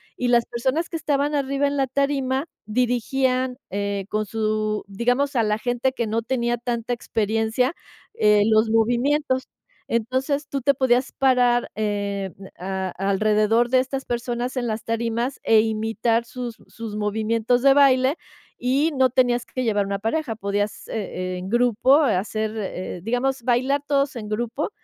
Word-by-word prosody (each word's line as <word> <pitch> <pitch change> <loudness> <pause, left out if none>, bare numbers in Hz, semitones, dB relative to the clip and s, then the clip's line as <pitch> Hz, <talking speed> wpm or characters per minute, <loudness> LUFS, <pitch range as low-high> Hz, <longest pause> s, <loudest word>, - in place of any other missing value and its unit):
y 250 - -1
las 240 -1 +4
personas 265 +8 -1
que - - -7
estaban 290 -2 0
arriba 275 0 0
en 280 - -2
la 270 -2 +1
tarima 275 0 0 0.2
dirigían, 250 +2 0
eh, 200 0 -2
con 215 0 -1
su 215 0 -1
digamos, 245 +7 0
a 230 - +3
la 210 0 +1
gente 245 +3 0
que 235 -3 -2
no 225 +2 0
tenía 240 0 0
tanta 240 0 -2
experiencia, 225 +4 0 0.4
eh, 210 -1 +4
los 220 +1 +4
movimientos. 260 +5 +1 0.4
Entonces, 260 +5 -1
tú 275 -1 -3
te 280 +3 +3
podías 255 -1 +2
parar, 250 -2 +2
eh, 200 -2 -2 0.3
a 190 +1 -3
alrededor 215 +4 +2
de 255 +1 +4
estas 265 +1 -3
personas 240 +1 -3
en 250 -2 -1
las 220 0 -3
tarimas 230 +3 -2
e 225 -1 +5
imitar 225 +1 0
sus 240 -1 -6
sus 225 -2 -7
movimientos 220 +3 0
de 275 -1 +7
baile 270 0 +4 0.4
y 270 +6 +1
no 260 0 +4
tenías 245 -1 +2
que 255 - -4
llevar 205 -3 +1
una 200 0 -3
pareja, 225 +3 -1
podías, 205 0 -2
e 185 -3 -4
en 185 +1 -6
grupo 245 +3 +4
hacer, 215 -3 0
eh, 185 -4 -4
eh - - -11
digamos, 245 +4 0
bailar 260 +3 +1
todos 280 -1 +1
en 215 -3 -6
grupo, 235 +6 -2
240 Hz, 155 wpm, -23 LUFS, 215-260 Hz, 0.4 s, de